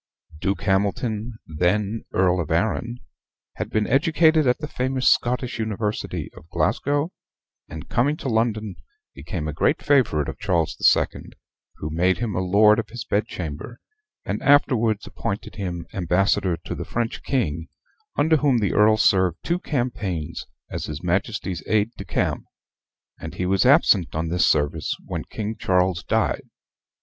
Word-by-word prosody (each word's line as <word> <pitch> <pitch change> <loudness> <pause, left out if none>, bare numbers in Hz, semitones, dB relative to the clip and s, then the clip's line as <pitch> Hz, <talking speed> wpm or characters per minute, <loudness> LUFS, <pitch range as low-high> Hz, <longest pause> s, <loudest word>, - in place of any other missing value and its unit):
Duke 100 +4 -1
Hamilton, 105 +3 0
then 100 +7 0
Earl 90 -1 +2
of 80 -3 -3
Arran, 110 +7 -1 0.6
had - - -3
been 110 -1 +1
educated 160 - +3
at 125 - +3
the 150 - -5
famous 130 -1 -1
Scottish 125 -1 +1
university 110 -1 -3
of 80 - -15
Glasgow, 145 - 0 0.6
and, 80 +1 -8
coming 145 +6 +1
to - - -5
London, 110 -4 0 0.4
became 75 +3 -5
a 75 - -3
great - - +1
favorite 125 - +3
of - - -6
Charles 90 -6 0
the - - -3
Second, - - +2 0.4
who 75 - -5
made 90 +3 +2
him 115 -3 -2
a 90 - -1
lord 105 +4 +5
of 115 - -4
his 115 -1 -7
bedchamber, 95 +1 -3 0.5
and - - -3
afterwards 115 -6 +3
appointed 100 +2 -5
him 90 -4 -4
ambassador 90 0 +1
to 80 - -7
the - - -5
French 115 -1 -3
king, 85 - -1 0.5
under 160 +1 +4
whom 140 -4 +3
the 105 -3 0
Earl 110 +1 +5
served 95 -5 +3
two 175 +1 0
campaigns 115 - -3 0.2
as - - -3
his 75 +2 -6
Majesty's 95 0 -1
aide 110 +1 +2
de 100 - -8
camp; - - -1 0.7
and - - -7
he 90 - -2
was 95 +5 +2
absent 110 - +4
on 80 +1 -1
this 90 +1 +2
service 75 +1 +1
when - - -4
King 110 +1 -4
Charles 90 -1 +1
died. - - 0
105 Hz, 155 wpm, -23 LUFS, 90-120 Hz, 0.7 s, lord